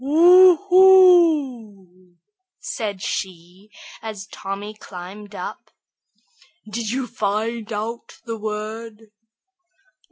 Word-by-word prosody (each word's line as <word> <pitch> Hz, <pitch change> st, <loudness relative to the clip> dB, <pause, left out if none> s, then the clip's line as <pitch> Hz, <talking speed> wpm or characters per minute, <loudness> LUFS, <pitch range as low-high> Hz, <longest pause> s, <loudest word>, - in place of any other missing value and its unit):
"Oo 350 Hz, +5 st, +6 dB
hoo," 285 Hz, -, +3 dB, 0.4 s
said 205 Hz, -5 st, -5 dB
she, 185 Hz, +2 st, -6 dB, 0.3 s
as 210 Hz, -3 st, -8 dB
Tommy 195 Hz, +3 st, -7 dB
climbed 205 Hz, +1 st, -11 dB
up. -, -, -8 dB, 1.0 s
"Did 220 Hz, 0 st, -5 dB
you 260 Hz, +3 st, -2 dB
find 220 Hz, 0 st, -3 dB
out 220 Hz, +3 st, -6 dB
the 230 Hz, -1 st, -5 dB
word?" 215 Hz, +1 st, -7 dB
215 Hz, 85 wpm, -21 LUFS, 200-255 Hz, 1.0 s, Oo